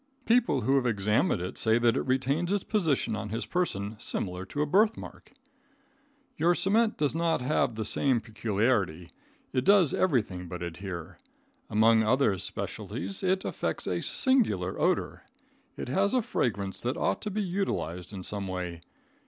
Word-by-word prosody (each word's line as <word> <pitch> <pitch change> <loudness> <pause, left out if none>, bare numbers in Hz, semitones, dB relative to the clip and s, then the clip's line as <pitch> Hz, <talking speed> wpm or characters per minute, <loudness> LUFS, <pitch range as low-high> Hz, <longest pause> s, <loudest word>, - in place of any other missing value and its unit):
People 230 - +3
who 135 +5 +2
have 130 -2 +1
examined 105 -4 +1
it 90 - -6
say 110 0 +3
that 120 -1 +3
it - - +1
retains 135 +7 0
its 205 -2 0
position 160 - 0
on 105 0 -5
his 115 +3 -3
person 110 - -2
similar 90 -3 -4
to 145 +7 -1
a - - 0
birthmark. 210 +8 0 1.1
Your 170 +3 +3
cement 220 +5 +2
does 145 -2 +1
not 165 -4 0
have 125 -3 +1
the 110 -1 -3
same 120 +3 +2
peculiarity. 105 -6 -1 0.4
It 130 - +1
does 195 -5 +5
everything 105 - 0
but 90 +1 -6
adhere. 85 0 -7 0.5
Among 110 +1 +4
other 110 -3 +2
specialties 95 0 -5
it 190 0 0
effects - - -3
a - - -1
singular 210 - +2
odor. - - 0 0.6
It - - -5
has 195 - +1
a 250 - +2
fragrance 100 - -2
that 125 +5 -2
ought - - 0
to 210 - -3
be 210 +1 -2
utilized 140 - -3
in 95 -3 -7
some 100 0 -3
way. 90 -2 -5
115 Hz, 160 wpm, -28 LUFS, -, 1.1 s, does